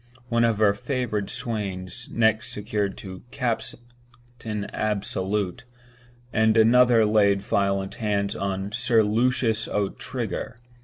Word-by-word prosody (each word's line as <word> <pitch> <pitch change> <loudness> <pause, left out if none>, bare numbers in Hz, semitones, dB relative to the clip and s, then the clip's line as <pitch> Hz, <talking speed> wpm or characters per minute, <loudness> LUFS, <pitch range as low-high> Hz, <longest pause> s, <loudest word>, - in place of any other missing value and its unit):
One 115 0 +2
of 115 -2 +2
her 105 -2 +4
favored 110 -2 -2
swains 105 -3 -4
next 110 0 +2
secured 105 -2 -2 0.3
"Captain 120 -2 -5
Absolute," 100 -1 -1 0.7
and 110 0 +3
another 115 0 +6
laid 100 -2 +3
violent 100 -1 0
hands 100 -2 0
on 100 0 -3
"Sir 115 0 +3
Lucius 115 +1 +1
O'Trigger." 105 +3 -3
110 Hz, 100 wpm, -25 LUFS, 100-120 Hz, 0.7 s, another